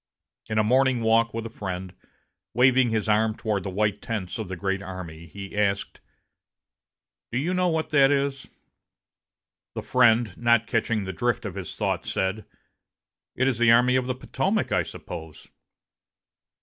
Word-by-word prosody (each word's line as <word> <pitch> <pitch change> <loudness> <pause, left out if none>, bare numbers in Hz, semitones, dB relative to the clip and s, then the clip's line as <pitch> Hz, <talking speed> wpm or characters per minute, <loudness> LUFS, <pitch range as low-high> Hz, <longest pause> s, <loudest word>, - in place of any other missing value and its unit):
In 110 - -1
a 110 - +4
morning 130 +2 +3
walk 115 0 +3
with 115 0 -5
a 115 - -6
friend, 95 -4 -5 0.6
waving 130 0 +4
his 110 -2 -1
arm 110 0 +2
toward 105 -3 -1
the 95 - -5
white 105 +1 -1
tents 115 -3 -4
of 110 - -4
the 95 - -5
great 95 +2 -2
army, 85 -4 -8
he 100 +5 -9
asked: 100 -1 -1 1.3
"Do 120 - -1
you 165 +8 0
know 180 0 +2
what 160 -2 -1
that 140 -2 +5
is?" 140 -1 -1 1.3
The - - -4
friend, 120 -5 +3
not 115 -1 +3
catching 115 -2 0
the 95 0 -5
drift 120 +4 -1
of 105 - -4
his 95 -2 -7
thought, - - -1
said, 95 +3 -2 0.9
"It 130 - +1
is 125 -3 0
the 120 -1 +5
Army 125 +2 +5
of 130 -1 +1
the 130 - -1
Potomac, 130 - -1
I - - +3
suppose." 80 -3 -9
110 Hz, 160 wpm, -25 LUFS, 100-125 Hz, 1.3 s, that